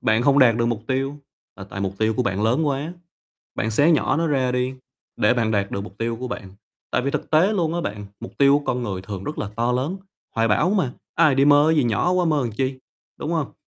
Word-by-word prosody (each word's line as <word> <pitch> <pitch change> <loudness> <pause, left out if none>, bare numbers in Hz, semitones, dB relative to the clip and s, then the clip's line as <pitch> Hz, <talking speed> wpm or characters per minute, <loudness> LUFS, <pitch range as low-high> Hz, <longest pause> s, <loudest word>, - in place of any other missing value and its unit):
bạn 110 +2 +2
không 140 +2 +4
đạt 120 -4 +6
được 115 - +1
mục 115 -2 -2
tiêu 135 +2 -1 0.4
là 95 - -8
tại 95 0 -8
mục 95 -1 -1
tiêu 110 0 +1
của 125 - 0
bạn 100 -3 -1
lớn 125 +8 +2
quá, 145 +4 -2 0.6
bạn 110 - -1
xé 145 +9 +4
nhỏ 155 - +2
nó 165 +1 +1
ra 130 -4 +1
đi 125 +1 -1 0.4
để 125 - +3
bạn 115 -2 0
đạt 100 -2 0
được - - -3
mục 100 +1 -13
tiêu 115 0 -2
của 125 +2 -5
bạn, 95 -5 -7 0.4
tại - - 0
vì 140 - -1
thực - - -4
tế 165 +7 +4
luôn 170 -5 0
á 175 - -1
bạn, 105 -8 -5
mục 120 - -8
tiêu 140 0 +5
của 145 - -11
con 125 -3 -1
người 95 -5 -4
thường 95 -1 -7
rất 150 - -5
là 100 - -3
to 120 +1 +1
lớn, 135 +9 -1 0.4
hoài 115 0 +2
bão 150 - +2
mà, 180 -12 +1 0.2
ai 145 -4 +4
đi 135 - +4
mơ 145 +2 +5
gì 140 - +3
nhỏ 120 +10 +1
quá 185 -1 +2
mơ 155 -3 +2
làm 120 - -2
chi, 130 +4 -2 0.4
đúng 160 - -3
hông? 160 -5 -2
125 Hz, 260 wpm, -22 LUFS, 110-145 Hz, 0.6 s, đạt